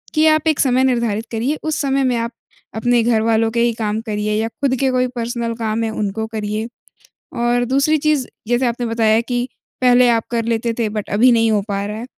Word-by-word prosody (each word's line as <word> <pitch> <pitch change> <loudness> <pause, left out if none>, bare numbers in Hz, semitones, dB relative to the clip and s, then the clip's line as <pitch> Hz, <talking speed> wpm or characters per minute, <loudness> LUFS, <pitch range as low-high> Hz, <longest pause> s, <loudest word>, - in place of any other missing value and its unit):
कि 310 +1 +4
आप 310 0 +3
एक 310 - +2
समय 260 -1 +3
निर्धारित 235 -4 0
करिए, 240 +7 -1
उस 315 -1 -1
समय 275 -1 +1
में 255 -2 +1
आप 230 +1 -2 0.4
अपने 240 +2 +2
घरवालों 225 -1 +2
के 235 - -1
ही 235 -1 +2
काम 215 -1 -2
करिए 210 -1 -2
या 225 - -1
खुद 260 +3 -1
के 270 - +3
कोई 255 0 +1
पर्सनल 235 0 -2
काम 225 0 -2
हैं, 225 - -1
उनको 215 0 -3
करिए। 215 0 -3 0.8
और 245 0 +2
दूसरी 275 +5 +2
चीज़, 295 -3 +1 0.2
जैसे 245 +1 +2
आपने 240 0 -2
बताया 225 -1 +2
कि 245 +1 -2 0.3
पहले 250 0 +5
आप 225 -1 +1
कर 230 -1 -1
लेते 230 0 -1
थे 230 -2 +1
बट 210 -1 -5
अभी 235 +5 +4
नहीं 225 -1 +3
हो 210 - +2
पा 200 0 -2
रहा 210 +1 -5
है, 240 - -6
235 Hz, 215 wpm, -19 LUFS, 220-250 Hz, 0.8 s, पहले